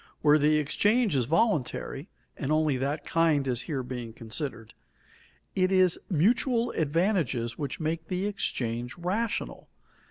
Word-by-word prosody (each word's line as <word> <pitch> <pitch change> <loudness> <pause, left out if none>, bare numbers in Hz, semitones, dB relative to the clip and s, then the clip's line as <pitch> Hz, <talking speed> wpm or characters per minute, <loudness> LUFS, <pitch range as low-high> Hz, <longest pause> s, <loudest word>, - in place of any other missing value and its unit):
Where 150 0 +6
the 150 +1 +4
exchange 205 - +2
is 125 -3 +2
voluntary 155 - 0 0.3
(and 140 +1 -3
only 155 -2 +2
that 140 +4 -2
kind 160 -4 +2
is 125 -1 +1
here 135 -4 -1
being 120 -2 -6
considered), 115 0 -6 0.8
it 185 0 +2
is 185 -2 +4
mutual 230 - +2
advantages 150 - 0
which 145 +4 -4
make 160 0 -2
the 185 +1 -2
exchange 120 - -3
rational. 205 +6 -3
155 Hz, 130 wpm, -28 LUFS, 130-185 Hz, 0.8 s, Where